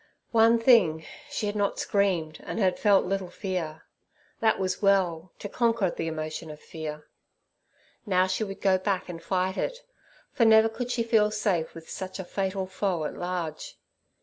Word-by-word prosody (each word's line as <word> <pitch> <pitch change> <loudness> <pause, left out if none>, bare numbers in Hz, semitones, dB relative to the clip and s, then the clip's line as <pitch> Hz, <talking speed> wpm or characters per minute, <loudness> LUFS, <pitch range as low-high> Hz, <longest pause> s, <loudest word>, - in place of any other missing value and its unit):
One 230 0 +5
thing, 210 -10 +4 0.2
she - - -3
had 205 0 -2
not 205 -1 0
screamed 180 -6 0
and - - -6
had 190 -4 +1
felt 200 -3 +4
little 190 -1 -2
fear; 175 -4 -4 0.6
that 220 -1 +3
was 185 -1 -2
well, 185 -4 +2
to - - -6
conquer 230 -4 +1
the 165 - -4
emotion 155 0 -4
of 150 0 -9
fear. 155 -2 -7 1.0
Now 185 -2 +3
she 185 +3 -1
would 195 -2 -6
go 190 -1 +3
back 190 -1 -1
and 165 -1 -7
fight 185 0 -1
it, - - -3 0.5
for 235 - +2
never 220 0 +6
could 245 +2 -5
she 245 -1 0
feel 220 -2 +3
safe 205 -6 -1
with 165 -1 -10
such 190 -1 -6
a 190 - -4
fatal 190 +1 -2
foe 185 -3 -2
at - - -3
large. 175 -3 -4
190 Hz, 175 wpm, -27 LUFS, 170-210 Hz, 1.0 s, never